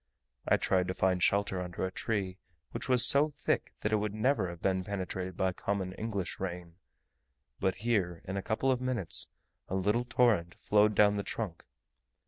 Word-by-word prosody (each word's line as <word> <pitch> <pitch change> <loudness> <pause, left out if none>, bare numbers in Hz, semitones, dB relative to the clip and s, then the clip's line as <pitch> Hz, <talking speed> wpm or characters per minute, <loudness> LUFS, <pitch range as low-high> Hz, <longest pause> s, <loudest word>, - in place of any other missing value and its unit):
I - - +5
tried 90 -1 +1
to 95 - -2
find 95 -1 +1
shelter 100 -1 +2
under 90 +1 -3
a 95 - -3
tree, 95 -4 -2 0.3
which - - -6
was 125 -2 +6
so 145 +2 +5
thick 145 0 -1
that 105 - -1
it - - +5
would 105 0 -2
never 110 -4 +1
have 85 0 -8
been 95 0 0
penetrated 95 -2 -4
by 95 -1 +1
common 95 -1 -2
English 100 -3 -3
rain; 90 -2 -5 0.8
but 95 -1 +1
here, 90 -8 0
in 95 - -4
a 100 - -1
couple 115 +6 0
of 125 -1 0
minutes, 125 -10 +1 0.4
a 95 - -3
little 105 +5 +1
torrent 110 -9 +2
flowed 105 0 +3
down 105 0 +5
the 100 - -1
trunk. 100 -7 -4
100 Hz, 180 wpm, -31 LUFS, 90-110 Hz, 0.8 s, was